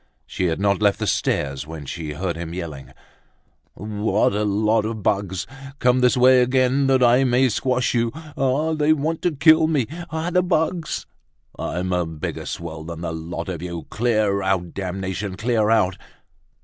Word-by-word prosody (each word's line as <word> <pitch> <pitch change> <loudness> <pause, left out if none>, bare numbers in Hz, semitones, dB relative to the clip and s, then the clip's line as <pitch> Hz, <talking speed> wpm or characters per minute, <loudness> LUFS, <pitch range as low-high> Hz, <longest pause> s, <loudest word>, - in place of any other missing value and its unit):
She 90 - -3
had 85 -1 0
not 100 0 +1
left 100 -1 +3
the 110 - -2
stairs 75 -8 -1
when 80 -2 -8
she 80 0 -5
heard 85 +2 -3
him 85 0 -6
yelling: 80 -7 -7 0.8
"What 105 0 0
a 105 +1 0
lot 105 +2 +2
of 110 -1 -4
bugs!—Come 125 +8 -1
this 125 +1 +3
way 130 0 +6
again 130 +2 +2
that 130 -1 +3
I 125 +2 +5
may 130 0 +3
squash 125 +2 0
you!—Ah! 140 +4 -1
they 155 0 +3
want 155 +2 -2
to 175 - +1
kill 155 +3 +5
me! 150 -7 +1 0.2
ah! 160 +2 -3
the 180 - +3
bugs!—I'm 155 - -3
a 90 -2 0
bigger 80 -2 -5
swell 80 -2 -6
than 85 0 -7
the 85 -1 -3
lot 85 +1 -5
of 90 -4 -4
you! 85 -2 -5
Clear 110 -4 +1
out, 95 -3 -1
damnation! 95 +1 -4
Clear 110 -1 +1
out." 105 -5 +2
105 Hz, 160 wpm, -22 LUFS, 90-130 Hz, 0.8 s, way